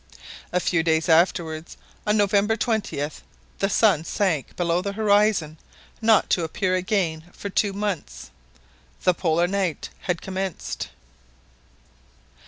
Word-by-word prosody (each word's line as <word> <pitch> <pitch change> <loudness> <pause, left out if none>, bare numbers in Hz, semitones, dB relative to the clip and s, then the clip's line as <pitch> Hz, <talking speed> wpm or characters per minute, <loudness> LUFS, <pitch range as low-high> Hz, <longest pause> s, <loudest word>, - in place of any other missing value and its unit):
A 180 - +2
few 175 -1 +1
days 160 0 +1
afterwards, 165 -1 +1 0.3
on 210 +1 +3
November 205 +2 +3
.20th, 205 -11 -2 0.4
the 195 - +1
sun 195 -7 +3
sunk 165 -5 -1
below 175 0 +1
the 200 +1 -3
horizon 205 -7 +2 0.4
not 220 -1 +4
to 175 - +2
appear 185 +3 -1
again 185 -4 0
for 200 - -6
two 205 +1 +1
months. 200 -5 -4 0.7
The 180 - +4
Polar 170 -1 +1
night 185 -4 -2 0.2
had 175 -2 0
commenced! 185 - -4
185 Hz, 120 wpm, -24 LUFS, 165-205 Hz, 0.7 s, not